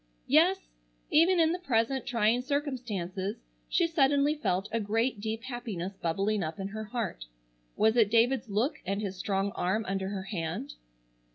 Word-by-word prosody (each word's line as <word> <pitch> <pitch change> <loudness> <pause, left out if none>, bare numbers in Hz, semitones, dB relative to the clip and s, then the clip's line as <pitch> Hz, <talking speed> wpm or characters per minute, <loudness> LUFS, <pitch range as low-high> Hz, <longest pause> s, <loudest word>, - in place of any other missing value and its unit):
Yes, - - +4 0.4
even 340 +3 +5
in 325 -1 +4
the 355 - -2
present 260 -4 0
trying 230 0 +2
circumstances 235 - -3 0.3
she 345 - +3
suddenly 285 -2 +3
felt 195 -10 -1
a 230 - 0
great 225 +3 0
deep 220 +1 -3
happiness 220 -7 -5
bubbling 195 +4 0
up 160 +3 -4
in 195 0 -3
her 215 +1 -5
heart. 215 - -4 0.5
Was 220 +1 +3
it 225 -4 +5
David's 230 +1 +3
look 220 +9 0
and 195 +2 -2
his 200 -3 -3
strong 195 +1 -1
arm 210 +5 -1
under 190 0 -2
her 195 -2 -4
hand? 165 - -4
220 Hz, 160 wpm, -29 LUFS, 195-255 Hz, 0.5 s, even